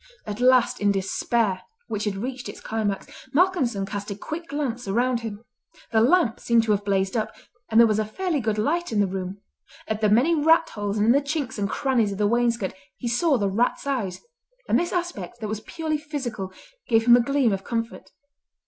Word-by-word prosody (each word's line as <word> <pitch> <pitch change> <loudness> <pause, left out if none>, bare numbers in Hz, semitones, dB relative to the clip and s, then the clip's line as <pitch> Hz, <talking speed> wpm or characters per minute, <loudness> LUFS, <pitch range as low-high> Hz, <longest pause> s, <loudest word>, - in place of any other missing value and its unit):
At 210 +1 -5
last 250 -2 +4
in 205 0 +4
despair, 195 +1 0 0.2
which 210 -1 -3
had 205 -2 -1
reached 250 +5 -5
its - - -9
climax, 210 -3 -2 0.3
Malcolmson 280 - +2
cast 205 +1 -5
a 200 - -3
quick 320 - -6
glance 265 -5 -3
round 240 +4 +1
him. 225 -2 -7 0.5
The 220 -1 +4
lamp 255 -1 +3
seemed 235 -1 +3
to 220 - 0
have 205 -1 +1
blazed 195 +1 0
up, 220 -2 -2 0.3
and 220 - +4
there 235 - +9
was 215 -1 +1
a - - +2
fairly 320 - -2
good 220 -3 -1
light 335 +10 0
in 215 - +1
the 200 - +4
room. 190 +1 -5 0.5
At 220 0 -2
the 210 - +3
many 250 +11 +4
rat 320 +1 +4
holes 205 0 -3
and 210 - +2
in 230 - +5
the 280 +3 +4
chinks 280 -5 -3
and 200 -1 0
crannies 240 -6 +1
of 195 - -5
the 210 - +1
wainscot 235 -2 +1 0.2
he 240 - -4
saw 270 +5 +2
the 200 -3 0
rats' 225 +8 0
eyes; 235 -10 -2 0.5
and - - +3
this 345 - -2
aspect, 295 - -4
that 220 - -4
was 215 0 -3
purely 315 +5 -3
physical, 265 -11 -5 0.4
gave 225 -1 +3
him 240 0 +8
a 245 - +5
gleam 265 -3 +2
of 195 0 -3
comfort. 230 0 -4
230 Hz, 210 wpm, -24 LUFS, 205-270 Hz, 0.5 s, there